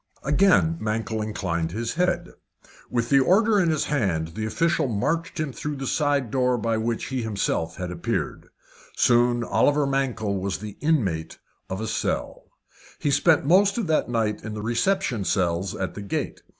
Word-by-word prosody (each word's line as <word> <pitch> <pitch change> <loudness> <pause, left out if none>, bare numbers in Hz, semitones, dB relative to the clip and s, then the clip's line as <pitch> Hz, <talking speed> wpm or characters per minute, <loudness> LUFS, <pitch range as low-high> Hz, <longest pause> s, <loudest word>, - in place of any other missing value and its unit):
Again 165 +2 +3
Mankell 110 0 -2
inclined 85 -6 -2
his 115 +2 -2
head. 175 0 0 0.6
With 120 -1 -1
the 140 - +5
order 205 - +4
in 175 -3 +2
his 155 -2 +1
hand, 95 - 0
the 110 +6 -4
official 170 +6 +1
marched 155 +10 -1
him 150 -4 -2
through 150 +3 -4
the 135 -1 -5
side 140 -4 0
door 125 -1 +2
by 115 0 0
which 115 +1 -2
he 130 - -3
had 120 - -2
himself 100 -6 -2
appeared. 90 -2 -3 0.5
Soon 120 0 +3
Oliver 145 +4 +2
Mankell 125 -7 -1
was 95 -2 -2
the 105 0 -8
inmate 100 - 0 0.3
of 95 - -3
a 110 - -3
cell. - - -2 0.5
He 145 - 0
spent 145 +1 +3
that 190 - +3
night 110 -3 -1
in 110 -1 -5
the 105 - -5
reception 120 - 0
cells 90 -1 0
at 95 - -3
the 100 - -7
gate. 100 - -3
120 Hz, 165 wpm, -24 LUFS, 105-150 Hz, 0.6 s, the